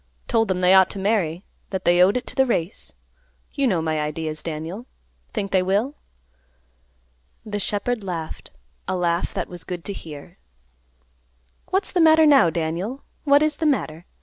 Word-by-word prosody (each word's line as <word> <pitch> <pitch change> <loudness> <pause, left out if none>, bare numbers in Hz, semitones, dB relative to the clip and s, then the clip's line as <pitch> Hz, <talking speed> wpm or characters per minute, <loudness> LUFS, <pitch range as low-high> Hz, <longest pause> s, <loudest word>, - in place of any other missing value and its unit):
Told 225 -2 +2
them 185 -1 -1
they 180 +1 +5
ought 190 -1 +6
to - - -8
marry; 190 -4 0 0.3
that 190 -1 -4
they 175 +1 +5
owed 195 +6 +5
it 250 - -4
to - - -9
the 265 0 +3
race. 175 -5 -2 0.6
You 280 -2 +1
know 175 -8 +1
my 160 -1 -1
ideas, 155 +1 -3
Daniel. 165 +9 -6 0.4
Think 200 -4 -3
they 190 - +3
will?" 200 +9 0 1.5
The 205 -1 -3
shepherd 210 +3 -1
laughed, 170 -4 -6 0.4
a - - -1
laugh 175 -1 0
that - - -2
was 175 -1 -8
good 175 -2 -6
to 200 - -3
hear. 150 - -10 1.3
"What's 380 +1 -1
the 360 - +2
matter 320 0 +6
now, 280 - +6
Daniel? 170 - -3 0.2
What 285 +1 +5
is 305 -1 0
the 320 - 0
matter? 170 - -1
190 Hz, 170 wpm, -23 LUFS, 170-245 Hz, 1.5 s, ought